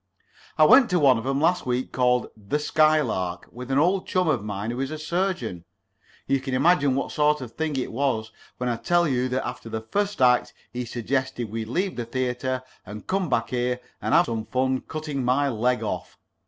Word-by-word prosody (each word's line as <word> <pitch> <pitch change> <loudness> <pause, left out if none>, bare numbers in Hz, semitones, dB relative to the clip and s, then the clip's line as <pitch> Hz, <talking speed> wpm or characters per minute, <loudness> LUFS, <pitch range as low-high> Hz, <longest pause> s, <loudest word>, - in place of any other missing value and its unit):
I - - +6
went 255 -2 +7
to 180 - +2
one 135 -6 +5
of 115 - -6
'em 135 0 +1
last 175 +4 +2
week 125 +1 -1
called 125 -1 +1
'The 105 +6 -2
Skylark,' 150 - +1
with 125 +1 -9
an 135 - +1
old 180 +6 +2
chum 185 -1 +1
of 130 -9 +1
mine 105 +1 -3
who 120 - -5
is 135 0 -1
a 155 - -5
surgeon. 155 - -2 0.6
You 135 - +1
can 130 -1 -3
imagine 145 -1 +3
what 140 - -2
sort 150 0 +2
of 125 -4 -7
a - - -31
thing 160 -2 -2
it 130 - -2
was 115 -4 -1 0.3
when 125 - -2
I 120 -1 0
tell 175 +7 +2
you 130 -2 0
that 130 +1 -1
after 125 -2 -7
the 110 0 -3
first 205 - -2
act 125 -1 +3 0.2
he 125 0 -3
suggested 125 -1 -2
we 115 0 -3
leave 180 - -2
the 120 - -3
theatre 130 +1 -2 0.2
and 105 +2 -9
come 190 -3 -1
back 115 -2 0
here 125 0 0 0.2
and - - +1
have - - +6
some 110 -2 -4
fun 130 +2 0
cutting 150 -4 -4
my 135 +3 +2
leg 125 +1 0
off. - - -4
130 Hz, 210 wpm, -25 LUFS, 120-150 Hz, 0.6 s, went